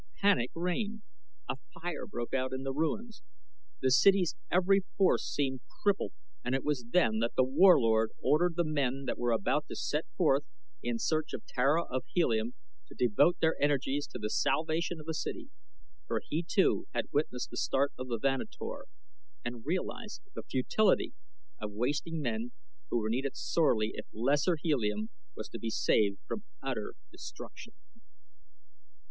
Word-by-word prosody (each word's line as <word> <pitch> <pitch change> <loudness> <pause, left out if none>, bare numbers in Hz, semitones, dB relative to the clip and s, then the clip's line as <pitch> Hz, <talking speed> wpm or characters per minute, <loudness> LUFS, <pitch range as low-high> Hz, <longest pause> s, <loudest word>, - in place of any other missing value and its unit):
Panic 200 -12 +3
reigned. 205 +6 -2 0.4
A - - -2 0.2
fire 175 -1 -4
broke 120 0 -5
out 130 0 0
in 130 0 -3
the 135 0 -2
ruins. 205 - -2 0.6
The 130 - +4
city's 190 +5 +5 0.2
every 190 +2 +4 0.2
force 195 -2 +4
seemed 130 -3 -1 0.2
crippled, 205 -1 +2 0.3
and 125 +2 0
it 135 - -1
was 145 -5 -1
then 110 -9 +3
that 115 +1 0
The 130 - +5
Warlord 130 - +5
ordered 165 +3 +3
the 175 - +2
men 140 -3 0
that - - -2
were 120 0 +1
about 115 +7 +1
to - - -6
set 150 +2 -1
forth 150 -5 +4 0.4
in 120 -1 -1
search 155 +5 0
of - - -5
Tara 140 +6 +2
of 130 -4 -3
Helium 115 -9 +1 0.3
to - - -14
devote 145 +9 +4
their 160 0 +3
energies 145 0 +1
to - - -7
the 105 -2 -3
salvation 165 +2 +1
of 155 - -10
the 160 - -2
city, 290 - -4 0.6
for - - 0
he 160 - 0
too 180 +3 +2
had - - -2
witnessed 140 -4 -1
the - - -7
start 140 +3 +1
of 130 - -6
the 120 -2 -1
Vanator 135 +2 -2 0.6
and 120 -1 -5
realized 210 +6 -3
the - - -5
futility 190 +11 +2 0.5
of 105 -1 -5
wasting 145 +8 -1
men 115 0 -2 0.4
who - - +1
were 110 -2 0
needed 130 +4 -1
sorely 115 -10 +2
if - - -7
Lesser 145 - +2
Helium 110 -9 0 0.2
was 110 - -6
to 115 - -7
be 115 - -2
saved 100 -2 +2
from 210 - -4 0.2
utter 125 -6 -3 0.2
destruction. - - -10
140 Hz, 160 wpm, -31 LUFS, 120-170 Hz, 0.6 s, city's